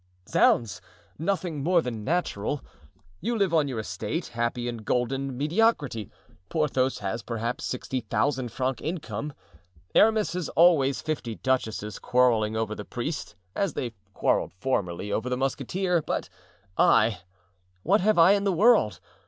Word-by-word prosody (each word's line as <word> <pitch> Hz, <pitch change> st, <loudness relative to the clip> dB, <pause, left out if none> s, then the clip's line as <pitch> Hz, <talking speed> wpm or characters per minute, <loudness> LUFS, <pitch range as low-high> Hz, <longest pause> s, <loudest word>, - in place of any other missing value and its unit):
"Zounds! 115 Hz, -6 st, +2 dB, 0.4 s
nothing 170 Hz, -3 st, -1 dB
more 175 Hz, +4 st, +3 dB
than 115 Hz, -4 st, -4 dB
natural. 145 Hz, -, -1 dB, 0.6 s
You 230 Hz, +6 st, -1 dB
live 195 Hz, -5 st, +1 dB
on 155 Hz, -3 st, +3 dB
your 130 Hz, -4 st, -4 dB
estate, 110 Hz, +8 st, -3 dB
happy 120 Hz, +1 st, -2 dB
in 120 Hz, -1 st, -3 dB
golden 125 Hz, +4 st, -1 dB
mediocrity. 150 Hz, -, +1 dB, 0.4 s
Porthos 135 Hz, -5 st, +1 dB
has, 105 Hz, +3 st, -3 dB
perhaps, 115 Hz, +1 st, -3 dB
sixty 130 Hz, +1 st, -3 dB
thousand 120 Hz, +3 st, -1 dB
francs 130 Hz, -1 st, -2 dB
income. 150 Hz, -, -4 dB, 0.6 s
Aramis 215 Hz, -4 st, +4 dB
has 180 Hz, -3 st, -3 dB
always 155 Hz, -6 st, +4 dB
fifty 150 Hz, -8 st, -3 dB
duchesses 110 Hz, -5 st, -2 dB
quarreling 115 Hz, -4 st, +2 dB
over 110 Hz, -1 st, -1 dB
the 105 Hz, -, -6 dB
priest, 125 Hz, +9 st, -5 dB, 0.2 s
as 195 Hz, -7 st, -1 dB
they 120 Hz, -2 st, -3 dB, 0.2 s
quarreled -, -, +1 dB
formerly 95 Hz, -3 st, -2 dB
over 120 Hz, +3 st, -1 dB
the 125 Hz, -, -1 dB
musketeer; 165 Hz, +7 st, 0 dB
but -, -, -3 dB, 0.5 s
I—what 90 Hz, -, +1 dB
have 215 Hz, +1 st, +3 dB
I 170 Hz, +3 st, +7 dB
in 200 Hz, 0 st, +3 dB
the 200 Hz, -, +2 dB
world? 205 Hz, -, +4 dB
130 Hz, 135 wpm, -26 LUFS, 110-165 Hz, 0.6 s, I